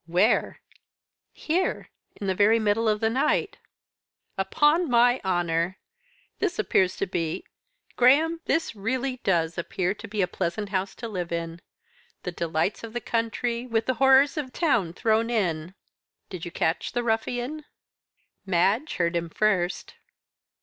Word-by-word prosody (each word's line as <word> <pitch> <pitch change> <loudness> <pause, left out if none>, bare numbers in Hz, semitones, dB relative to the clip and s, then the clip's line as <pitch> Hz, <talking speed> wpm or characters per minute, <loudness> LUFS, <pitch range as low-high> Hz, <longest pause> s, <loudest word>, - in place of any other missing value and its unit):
"Where?" 180 +7 +2 0.7
"Here 360 +4 -2 0.3
in 205 - -4
the 190 - +1
very 205 +4 +4
middle 220 +1 +1
of 210 -1 0
the 220 - +2
night." 260 +4 0 0.8
"Upon 295 - +2
my 245 +1 +4
honour! 175 -1 0 0.6
this - - -1
appears 190 -2 +2
to - - 0
be 175 - -3 0.5
Graham, 310 +7 +4
this 325 -7 0
really 255 +5 -2
does 170 -6 0
appear 180 +2 -1
to 210 +2 -10
be 205 -1 -1
a - - +1
pleasant 195 +3 -3
house 190 0 -2
to 230 - -6
live 180 -6 -4
in. 170 0 -4 0.6
The 180 - -3
delights 170 +4 -1
of 225 -1 -8
the 240 - -2
country, 235 +1 -2
with 225 -2 0
the 255 - +1
horrors 270 +2 +5
of 275 -4 -3
town 230 - +1
thrown 225 +4 +1
in. 180 -6 -1 0.6
Did 180 -3 -6
you 175 - -6
catch 160 +1 -1
the 245 -1 -1
ruffian?" 245 +6 -2 0.8
"Madge 195 - +1
heard 170 -1 0
him 170 0 -1
first." 190 -2 0
215 Hz, 145 wpm, -26 LUFS, 180-245 Hz, 0.8 s, horrors